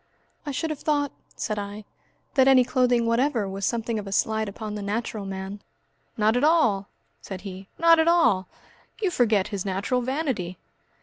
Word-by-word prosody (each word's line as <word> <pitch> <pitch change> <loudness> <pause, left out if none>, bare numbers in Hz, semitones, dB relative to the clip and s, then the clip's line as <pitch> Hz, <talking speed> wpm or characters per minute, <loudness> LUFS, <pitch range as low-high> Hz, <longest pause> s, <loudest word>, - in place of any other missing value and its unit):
"I - - -1
should 320 +4 -2
have 300 - -5
thought," 290 -2 0 0.2
said 215 -1 -2
I, 205 +1 -6 0.5
"that 265 -3 +4
any 265 -2 +7
clothing 245 -2 +2
whatever 230 -1 +1
was 195 0 -2
something 230 -1 -1
of 205 - -7
a - - -6
slight 220 +2 +1
upon 215 +1 -6
the 210 - -4
natural 210 0 -3
man." 195 +1 -6 0.6
"Not 215 +1 +3
at 245 - +1
all," 290 -12 +3 0.3
said 190 -2 -7
he, 190 0 -8
"not 335 0 +6
at 320 - +3
all! 235 - +4 0.5
You 395 -4 0
forget 215 - +2
his 200 -3 -3
natural 200 +6 -1
vanity!" 250 - -2
220 Hz, 175 wpm, -25 LUFS, 200-265 Hz, 0.6 s, any